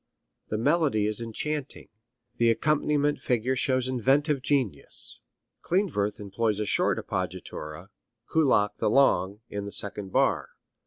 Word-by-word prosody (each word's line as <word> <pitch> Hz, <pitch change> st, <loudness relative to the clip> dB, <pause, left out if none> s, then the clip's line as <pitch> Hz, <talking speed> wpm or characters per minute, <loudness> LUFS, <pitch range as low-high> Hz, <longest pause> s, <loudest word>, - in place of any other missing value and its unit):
The 110 Hz, -, -1 dB
melody 125 Hz, -3 st, +2 dB
is 105 Hz, +2 st, -1 dB
enchanting. 140 Hz, +5 st, -3 dB, 0.5 s
The 115 Hz, 0 st, +4 dB
accompaniment 145 Hz, +3 st, +1 dB
figure 125 Hz, +1 st, 0 dB
shows 130 Hz, 0 st, +1 dB
inventive 135 Hz, +3 st, +2 dB
genius. 125 Hz, -, +1 dB, 0.4 s
Klindworth 165 Hz, -, 0 dB
employs 105 Hz, +1 st, -1 dB
a 105 Hz, -, -1 dB
short -, -, +1 dB
appoggiatura, 75 Hz, +5 st, -5 dB, 0.4 s
Kullak 130 Hz, -10 st, +3 dB
the -, -, +1 dB
long, 105 Hz, -5 st, +3 dB
in 100 Hz, 0 st, -4 dB
the 100 Hz, -, -6 dB
second 100 Hz, -1 st, -2 dB
bar. -, -, +1 dB
115 Hz, 120 wpm, -27 LUFS, 105-145 Hz, 0.5 s, The